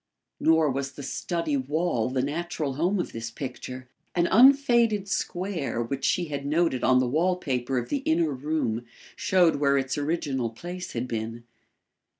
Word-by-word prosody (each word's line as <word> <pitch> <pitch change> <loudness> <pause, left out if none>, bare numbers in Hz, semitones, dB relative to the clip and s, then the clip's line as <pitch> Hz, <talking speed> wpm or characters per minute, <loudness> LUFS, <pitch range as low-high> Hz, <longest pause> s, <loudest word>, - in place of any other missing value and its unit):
Nor 160 -2 +4
was 135 +1 -3
the 140 - -8
study 165 +2 -2
wall 140 -3 0
the 130 0 0
natural 155 -1 -2
home 175 +8 0
of 175 - -2
this 115 0 -5
picture. 130 0 -7 0.3
An 170 -1 +3
unfaded 235 -4 +5
square 175 - -2
which 135 +4 -4
she 180 - +2
had 140 -3 -4
noted 150 -2 +1
on 130 0 +5
the 130 - +3
wall 165 +9 +2
paper 130 -6 -2
of 120 - -2
the 290 - +1
inner 165 - +1
room 130 -4 -2 0.3
showed 180 -5 +3
where 140 -1 +3
its 135 +1 -1
original 145 -5 -1
place 175 +10 -7
had 120 +1 -2
been. 115 0 -4
145 Hz, 160 wpm, -26 LUFS, 130-175 Hz, 0.3 s, unfaded